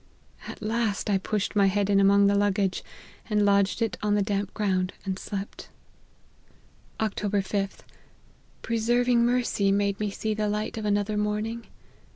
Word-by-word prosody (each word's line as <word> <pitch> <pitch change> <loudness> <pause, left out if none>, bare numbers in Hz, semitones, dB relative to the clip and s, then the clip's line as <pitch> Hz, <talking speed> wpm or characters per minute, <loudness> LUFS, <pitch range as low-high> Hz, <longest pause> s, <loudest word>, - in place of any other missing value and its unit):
At - - -8
last 215 -2 -1
I 195 - +2
pushed 210 +2 -2
my 200 -1 +5
head 200 +1 +1
in 200 -1 +3
among 200 +1 +5
the 200 - +4
luggage, 200 -1 +1 0.5
and 210 -1 +2
lodged 200 +3 +2
it 225 - -2
on 210 -1 +1
the 205 - +2
damp 200 -1 -2
ground, 185 -3 0
and 190 0 -3
slept. 200 -1 -6 0.6
" - - -33
Oct. 220 -2 -1
5th. 195 0 -2 0.8
Preserving 235 +1 +2
mercy 240 -5 +1
made 200 0 0
me 210 -1 -1
see 215 +2 -2
the 210 0 -1
light 210 +1 -2
of 215 - -5
another 205 0 0
morning. 210 +2 -2
205 Hz, 160 wpm, -26 LUFS, 200-215 Hz, 0.8 s, my